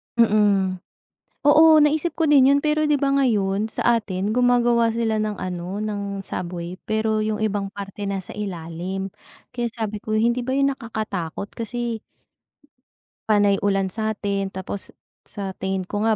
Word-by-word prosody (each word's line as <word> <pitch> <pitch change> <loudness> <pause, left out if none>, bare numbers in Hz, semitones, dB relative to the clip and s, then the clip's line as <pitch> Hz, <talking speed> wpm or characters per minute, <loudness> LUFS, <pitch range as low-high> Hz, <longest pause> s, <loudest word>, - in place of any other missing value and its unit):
Mm. 205 -5 +3 0.7
Oo, 315 +2 +7
naisip 305 +3 +2
ko 325 - +1
din 280 -3 +6
'yon, 280 0 +5
pero, 305 0 +2
'di 295 - +4
ba, 275 0 +1
ngayon, 215 -6 +1
sa 235 +1 +2
atin, 195 0 -3
gumagawa 240 -1 +3
sila 225 -1 0
ng 210 -1 -2
ano, 180 +1 -4
ng 200 -2 -4
subway. 175 0 -5
Pero 220 0 +1
yung 215 0 0
ibang 205 -2 -1
parte, 200 0 -6
nasa 195 -2 -4
ilalim. 185 0 -5 0.4
Kaya 240 -1 -2
sabi 215 -2 -4
ko, 215 +1 -2
hindi 235 +3 +2
ba 260 +2 -2
'yon 275 0 +3
nakakatakot, 210 - -5
kasi 235 0 -4 1.3
panay 205 -2 +4
ulan 195 -1 0
sa'tin, 205 -2 -2
tapos 190 +1 -6 0.4
sa 195 -2 -5
tingin 190 0 -1
ko 205 +3 -4
nga, 220 - +4
215 Hz, 150 wpm, -23 LUFS, 195-240 Hz, 1.3 s, Oo